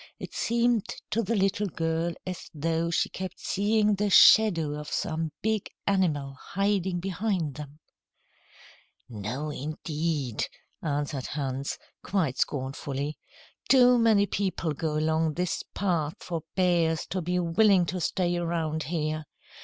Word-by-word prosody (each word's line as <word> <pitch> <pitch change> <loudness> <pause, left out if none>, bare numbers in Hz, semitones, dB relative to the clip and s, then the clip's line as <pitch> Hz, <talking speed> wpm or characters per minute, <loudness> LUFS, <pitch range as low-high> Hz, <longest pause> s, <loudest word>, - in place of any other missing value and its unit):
It - - -8
seemed 235 -2 +1 0.3
to 230 - +2
the 230 +2 -1
little 195 +1 +1
girl 165 0 -1
as 185 -2 -6
though 165 +2 0
she 170 - +1
kept 185 -1 -6
seeing 210 +1 +2
the 205 +1 0
shadow 180 -6 +6
of 150 0 -6
some 160 -1 -1
big 220 -2 0 0.2
animal 155 -9 +1
hiding 195 -2 0
behind 185 -4 -1
them. 145 +1 -9 1.3
"No, 125 +7 -4
indeed," 150 -2 -2 0.3
answered 145 -3 -2
Hans, 135 -1 -3 0.2
quite 160 -10 -1
scornfully. 140 +2 -2 0.5
"Too 250 -2 +6
many 220 -3 +4
people 185 -5 -1
go 155 +1 -2
along 160 0 +1
this 180 0 -1
path 165 -6 0
for 170 -2 -4
bears 170 -4 +2
to 185 - -1
be 180 +2 -1
willing 180 +2 +4
to 180 +2 -3
stay 175 0 0
around 165 -2 -1
here. 155 0 -2
170 Hz, 130 wpm, -27 LUFS, 150-195 Hz, 1.3 s, shadow